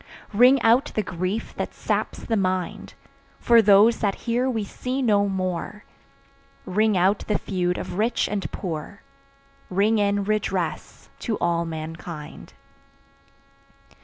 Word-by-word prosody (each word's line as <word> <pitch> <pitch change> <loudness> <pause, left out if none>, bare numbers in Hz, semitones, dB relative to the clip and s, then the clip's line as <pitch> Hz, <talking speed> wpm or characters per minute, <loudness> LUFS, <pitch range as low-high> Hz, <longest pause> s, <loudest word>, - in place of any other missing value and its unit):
Ring 250 +6 +6
out 235 +4 +5
the 215 - +1
grief 185 +4 -3
that - - -4
saps - - -2
the 225 - 0
mind, 185 -3 -2 0.4
For 235 -1 +5
those 210 +2 +5
that 200 -2 0
here 245 +2 +1
we 225 -4 -1
see 250 +6 -4
no 205 -5 +2
more, 185 +2 -3 0.8
Ring 210 +1 +2
out 190 +3 +3
the 210 - +1
feud 180 -2 -2
of 180 +1 -5
rich 230 +2 +1
and 200 -1 -3
poor, 175 +2 -6 0.7
Ring 210 +4 +2
in 200 0 +1
redress 195 -5 -3
to 220 - -2
all 170 0 0
mankind. 160 -1 -8
200 Hz, 130 wpm, -24 LUFS, 180-220 Hz, 0.8 s, Ring